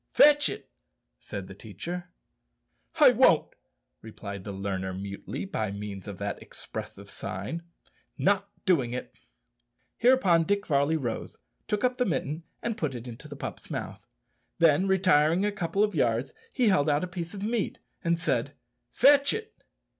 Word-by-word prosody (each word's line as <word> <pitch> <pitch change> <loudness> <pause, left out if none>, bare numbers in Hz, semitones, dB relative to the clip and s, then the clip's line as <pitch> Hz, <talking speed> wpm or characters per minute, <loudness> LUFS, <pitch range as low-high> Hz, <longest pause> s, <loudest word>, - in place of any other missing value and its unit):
"Fetch 295 0 +6
it," - - -7 0.5
said 100 -2 -6
the 95 - -10
teacher. 165 - -7 0.9
"I - - +9
won't," - - +4 0.5
replied 100 -3 -8
the 100 - -4
learner 95 -1 -3
mutely, 100 - -5
by 110 - -2
means 100 -1 -6
of 100 -2 -6
that 100 +1 -4
expressive - - -8
sign 100 - -5 0.6
not 200 0 +2 0.2
doing 135 - +2
it. 125 - -5 0.9
Hereupon 235 -9 +5
Dick 200 +2 0
Varley 145 +1 +2
rose, 120 -6 -4 0.3
took 210 0 -1
up 250 0 +2
the 250 - +2
mitten, 150 -1 -2 0.2
and 230 -1 -2
put 145 -5 -1
it 120 +1 -7
into 120 +5 -9
the 145 - -8
pup's - - -7
mouth. - - -5 0.5
Then, 165 +3 +4
retiring 180 -2 +4
a 210 - +1
couple 195 0 0
of 210 - +1
yards, - - +1 0.2
he 245 -4 +3
held 155 -6 +3
out 145 0 +2
the 180 - -2
piece 175 +1 -6
of 200 - -6
meat 220 -1 -1 0.3
and 170 -1 +1
said, 165 - 0 0.4
"Fetch 280 0 +5
it." 445 0 -5
165 Hz, 155 wpm, -28 LUFS, -, 0.9 s, I